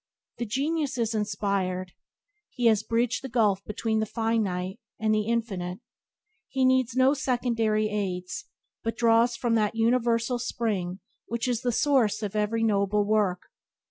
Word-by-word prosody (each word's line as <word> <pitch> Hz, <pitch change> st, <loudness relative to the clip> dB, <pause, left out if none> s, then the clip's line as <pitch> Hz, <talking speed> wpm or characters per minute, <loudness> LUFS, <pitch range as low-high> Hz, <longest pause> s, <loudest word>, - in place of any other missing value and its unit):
The 240 Hz, -, -2 dB
genius 285 Hz, +4 st, -1 dB
is 230 Hz, -2 st, 0 dB
inspired. 195 Hz, -3 st, -1 dB, 0.6 s
He 245 Hz, -, -3 dB
has 220 Hz, -2 st, +5 dB
bridged 230 Hz, +3 st, 0 dB
the 265 Hz, -, -5 dB
gulf 210 Hz, -5 st, +2 dB
between 220 Hz, +1 st, -1 dB
the 220 Hz, -, -1 dB
finite 210 Hz, -4 st, -1 dB, 0.2 s
and 215 Hz, 0 st, +2 dB
infinite. 210 Hz, -5 st, -2 dB, 0.7 s
He 265 Hz, -1 st, +1 dB
needs 260 Hz, -2 st, +2 dB
no 260 Hz, +2 st, +5 dB
secondary 235 Hz, -5 st, 0 dB
aids, 200 Hz, 0 st, -3 dB, 0.4 s
but 225 Hz, -, -2 dB
draws 235 Hz, +1 st, +4 dB
from 235 Hz, 0 st, 0 dB
that 215 Hz, -1 st, +1 dB
universal 235 Hz, +1 st, +1 dB
spring 205 Hz, -7 st, -2 dB, 0.3 s
which 235 Hz, +1 st, -2 dB
is 240 Hz, -2 st, 0 dB
the 250 Hz, -2 st, 0 dB
source 245 Hz, -5 st, +2 dB
of 205 Hz, 0 st, -4 dB
every 215 Hz, +2 st, 0 dB
noble 205 Hz, -1 st, +2 dB
work. 205 Hz, -4 st, +1 dB
225 Hz, 140 wpm, -27 LUFS, 205-240 Hz, 0.7 s, has